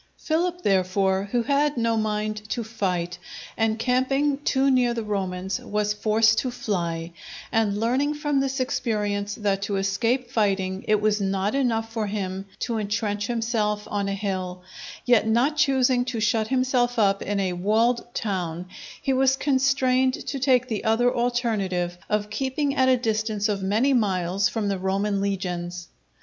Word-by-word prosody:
Philip, 350 +3 -1
therefore, 190 0 +2
who 240 -1 +1
had 285 +1 +1
no 230 -1 +1
mind 215 -1 -1
to 235 - -2
fight, 180 -5 -2 0.4
encamping 260 +6 +1
too 275 -1 +2
near 245 -2 +2
the 230 - -2
Romans, 190 -2 -2
was 210 0 -1
forced 220 +1 +3
to 255 - -1
fly; 170 -8 -3 0.4
and 210 -2 +1
learning 265 +6 +1
from 295 -2 0
this 270 0 -1
experience 210 -5 -1
that 200 -3 -1
to 200 0 -2
escape 230 +6 0
fighting 195 -5 0
it 215 -1 +3
was 210 -1 +1
not 195 +1 0
enough 225 -5 0
for 220 -2 -1
him 195 -1 -4
to 230 -2 -1
intrench 205 0 -2
himself 225 -3 -1
on 200 -1 -1
a 195 - -1
hill, 185 -3 -4 0.4
yet 240 -3 +4
not 245 +7 +2
choosing 260 -4 +3
to 245 -3 -3
shut 220 0 +1
himself 255 -1 +1
up 200 -3 +3
in 205 0 -1
a 185 -2 0
walled 225 +6 +1
town, 180 -5 -2 0.3
he 270 - 0
was 265 0 +3
constrained 260 -2 +2
to 275 - -3
take 255 -2 +3
the 220 -4 -3
other 240 +3 +2
alternative 215 -8 0
of 210 0 -1
keeping 270 +4 -1
at 260 -1 +3
a 255 - +5
distance 220 -3 -1
of 205 -2 -1
many 220 +8 +2
miles 190 -4 +1
from 220 -3 -2
the 195 -2 -1
Roman 195 +2 0
legions. 180 -3 -3
215 Hz, 160 wpm, -24 LUFS, 195-250 Hz, 0.4 s, a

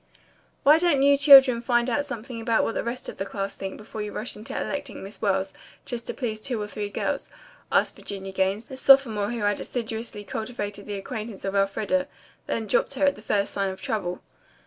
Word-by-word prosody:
"Why 300 +3 +7
don't 325 -6 +3
you 280 0 +6
children 270 -4 +8
find 240 0 +2
out 285 +4 0
something 235 -2 -6
about 225 0 +2
what - - -1
the - - -2
rest 235 +2 -4
of - - -7
the 195 - -3
class 195 -1 -4
think 195 -1 -6
before 215 0 -7
you 210 0 -4
rush 220 - -4
into 215 +6 -5
electing 285 -5 -4
Miss 195 +2 -10
Wells, 195 -2 0 0.3
just 240 -1 -5
to - - -3
please 220 -4 -3
two 240 -1 -2
or 210 - -2
three 205 0 -4
girls?" - - -2 0.4
asked - - +2
Virginia 195 -1 -5
Gaines, 190 +3 0
the 265 - -9
sophomore 250 -7 +5
who 240 -1 -3
had 205 0 +1
assiduously 225 -3 -4
cultivated 205 -2 -5
the 205 - -3
acquaintance 215 -1 -6
of 195 - -2
Elfreda 200 +8 +1 0.4
then 225 - -2
dropped 215 - +1
her 285 +2 +2
at 280 - +4
the 210 - -13
first 205 -2 0
sign 195 -1 0
of 190 - -7
trouble. 180 -5 -3
220 Hz, 210 wpm, -25 LUFS, 200-255 Hz, 0.4 s, children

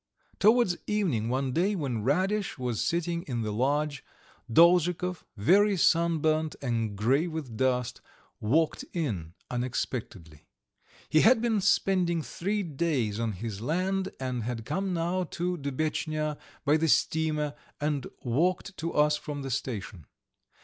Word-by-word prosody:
Towards 215 -3 +4
evening 165 - 0
one 130 +1 0
day, 190 +9 +1
when 135 - -2
Radish 190 - 0
was 125 -4 -2
sitting 170 0 0
in 120 -4 -2
the 105 - -2
lodge, 145 +4 0 0.5
Dolzhikov, 175 +4 +4
very 195 - +4
sunburnt 160 -2 +2
and 115 -5 -1
grey 135 - +2
with 155 -8 -5
dust, 125 0 0 0.4
walked 155 +9 +1
in 95 - -3 0.2
unexpectedly. 120 - -4 0.6
He 155 - +4
had 235 +1 +6
been 225 -3 +1
spending 180 -4 +2
three 200 +7 -2
days 140 - -1
on 115 -2 -1
his 105 +1 -6
land, 185 +8 0
and 130 -2 -2
had 115 0 -4
come 190 +8 -2
now 175 +2 0
to 180 +1 -2
Dubetchnya 155 +1 -2 0.3
by 150 +2 +4
the 160 +1 +1
steamer, 155 -1 +1 0.3
and 145 -3 -1 0.2
walked 175 - 0
to 165 +1 -3
us 150 0 +3
from 145 -2 -6
the 135 - -4
station. 105 - -4
150 Hz, 135 wpm, -28 LUFS, 125-175 Hz, 0.6 s, had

